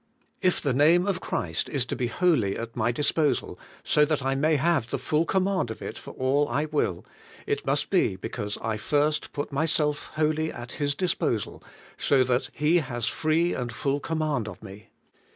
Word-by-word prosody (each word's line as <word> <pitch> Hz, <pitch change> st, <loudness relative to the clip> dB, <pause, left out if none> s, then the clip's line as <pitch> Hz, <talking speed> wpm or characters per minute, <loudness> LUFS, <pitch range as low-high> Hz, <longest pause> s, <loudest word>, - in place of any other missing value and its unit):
If 185 Hz, -2 st, +2 dB
the 140 Hz, -4 st, 0 dB
name 160 Hz, +7 st, +5 dB
of 195 Hz, -2 st, -1 dB
Christ 80 Hz, -3 st, -2 dB
is 135 Hz, -4 st, 0 dB
to -, -, -3 dB
be 125 Hz, -, -1 dB
wholly 120 Hz, -, +2 dB
at 115 Hz, 0 st, -6 dB
my 120 Hz, 0 st, +1 dB
disposal, 145 Hz, 0 st, 0 dB, 0.2 s
so 150 Hz, -, +4 dB
that 150 Hz, -2 st, -1 dB
I 135 Hz, -, +2 dB
may 155 Hz, +4 st, +2 dB
have 150 Hz, -4 st, +1 dB
the -, -, -1 dB
full 155 Hz, +2 st, +1 dB
command 190 Hz, -, +1 dB
of 110 Hz, -, -6 dB
it -, -, -6 dB
for -, -, -10 dB
all 140 Hz, +3 st, +2 dB
I 145 Hz, +2 st, 0 dB
will, 145 Hz, -, -1 dB, 0.4 s
it -, -, -2 dB
must -, -, 0 dB
be -, -, +3 dB
because 105 Hz, +1 st, -5 dB
I 110 Hz, -1 st, -1 dB
first 150 Hz, +6 st, 0 dB
put 145 Hz, +1 st, -4 dB
myself 150 Hz, 0 st, 0 dB
wholly 155 Hz, +1 st, +1 dB
at 120 Hz, 0 st, -8 dB
His 145 Hz, -1 st, -1 dB
disposal, 160 Hz, -, -1 dB, 0.4 s
so 135 Hz, -2 st, +4 dB
that 125 Hz, 0 st, 0 dB
He 150 Hz, +4 st, +2 dB
has 120 Hz, -7 st, -2 dB
free 165 Hz, +3 st, +1 dB
and 120 Hz, -2 st, -3 dB
full 135 Hz, +5 st, -1 dB
command 155 Hz, -7 st, -1 dB
of -, -, -9 dB
me. 100 Hz, +2 st, -11 dB
145 Hz, 190 wpm, -26 LUFS, 120-155 Hz, 0.4 s, name